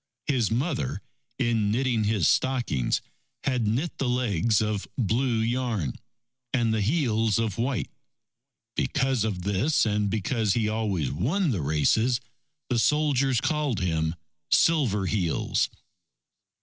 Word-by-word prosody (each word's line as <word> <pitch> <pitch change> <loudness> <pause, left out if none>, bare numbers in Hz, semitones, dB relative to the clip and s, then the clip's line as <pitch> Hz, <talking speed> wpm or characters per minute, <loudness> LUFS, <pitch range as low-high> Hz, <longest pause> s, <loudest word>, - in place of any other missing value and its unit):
His 125 -8 +1
mother, 125 - -2 0.3
in 115 -3 +1
knitting 120 -1 +1
his 105 -6 +2
stockings, 120 - +1 0.4
had 125 -5 0
knit 130 +11 -1
the 135 - 0
legs 115 -4 +1
of 105 -2 -1
blue 120 +1 +1
yarn 115 - -1 0.6
and 115 -3 +1
the 110 - 0
heels 115 - +1
of 115 -2 -1
white. 125 -3 -1 0.8
Because 135 -5 +1
of 100 -5 -2
this 100 - +2
and 105 -1 +1
because 110 0 0
he 115 -3 +1
always 105 - -1
won 160 - 0
the 100 -8 -1
races, 110 - +2 0.5
the 120 -2 +1
soldiers 140 -2 +2
called 145 -2 0
him: 80 -3 0 0.3
"Silver 125 -12 +3
Heels." 90 -5 0
115 Hz, 125 wpm, -26 LUFS, 100-130 Hz, 0.8 s, Silver